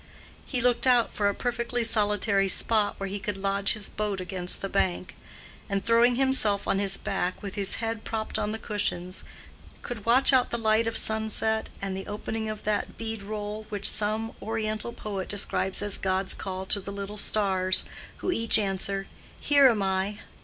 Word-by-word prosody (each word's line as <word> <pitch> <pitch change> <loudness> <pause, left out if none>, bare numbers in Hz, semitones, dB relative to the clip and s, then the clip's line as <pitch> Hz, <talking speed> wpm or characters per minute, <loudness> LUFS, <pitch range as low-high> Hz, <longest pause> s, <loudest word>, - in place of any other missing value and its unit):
He 250 -3 -1
looked 245 +1 +3
out 245 -2 +4
for 205 -1 +1
a 200 - -3
perfectly 240 0 -1
solitary 210 -3 +2
spot 210 +2 +3
where 195 - -3
he 200 +1 -4
could 205 0 -4
lodge 195 0 0
his 210 -3 -5
boat 210 -2 -3
against 180 0 -5
the - - 0
bank, 185 -2 -1 0.5
and, 200 -1 -2
throwing 235 +1 +4
himself 250 -6 +2
on 195 - +1
his 195 -1 +2
back 180 +3 -3
with 200 -2 -5
his 200 -1 -1
head 225 -1 -4
propped 220 -1 -3
on 210 - -1
the 220 - -3
cushions, 190 -4 -3 0.6
could 230 -4 -6
watch 260 +4 +7
out 255 -1 +4
the 235 - -1
light 220 0 +2
of 230 - +1
sunset 220 0 +1
and 195 -1 -2
the 190 - -6
opening 220 +1 -4
of 215 -1 -6
that 210 -1 -2
bead 225 -2 -5
roll 210 +1 -5
which 205 -2 -3
some 215 +2 0
oriental 220 0 -2
poet 200 -5 -5
describes 200 -1 0
as 205 -1 +1
God's 190 0 0
call 190 0 -5
to 200 - +2
the 200 - -8
little 200 +1 -6
stars, 190 -3 +2 0.3
who 370 - -2
each 230 -9 +5
answer, 195 -1 -2 0.3
"Here 285 -2 +5
am 215 -4 0
I." 190 +2 -1
210 Hz, 180 wpm, -27 LUFS, 195-225 Hz, 0.6 s, watch